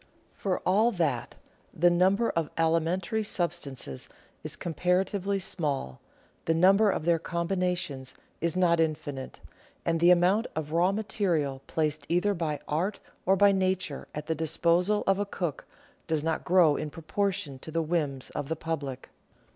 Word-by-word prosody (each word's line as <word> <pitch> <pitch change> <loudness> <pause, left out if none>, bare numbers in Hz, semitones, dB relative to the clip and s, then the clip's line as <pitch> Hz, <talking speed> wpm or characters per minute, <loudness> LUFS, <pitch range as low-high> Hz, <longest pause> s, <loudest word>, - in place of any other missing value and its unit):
For 190 -3 -2
all 215 +6 +3
that, 150 - -1 0.4
the 175 +2 +3
number 190 +6 +3
of 165 -3 -1
alimentary 165 +6 +1
substances 170 - -2 0.3
is - - -4
com 170 - -5
paratively 190 +4 +1
small, 145 - -2 0.4
the 165 - +2
number 195 +5 +5
of 160 - -1
their 170 -1 +3
combinations 170 -6 -2 0.3
is 170 +2 0
not 170 -2 +3
infinite, 145 -4 -2 0.4
and 165 0 +1
the 170 +2 +5
amount 180 +6 +4
of 155 -1 -4
raw 175 +3 +3
material 180 -10 -1
placed 155 -2 -1
either 180 +5 +2
by 160 -5 -2
art 180 +7 -1 0.3
or 190 - +5
by 200 +1 +5
nature 185 -6 -1
at 150 0 -4
the 160 - 0
disposal 170 +6 +2
of 195 0 +2
a 205 - 0
cook 175 -7 -4 0.4
does 155 -2 0
not 160 0 -1
grow 170 -4 +4
in 150 - -3
propor 165 +6 -1
tion 140 -7 -6
to 160 - -10
the 165 +1 0
whims 150 -5 -2
of 140 - -4
the 160 - 0
public. 145 -5 -5
170 Hz, 155 wpm, -28 LUFS, 155-185 Hz, 0.4 s, number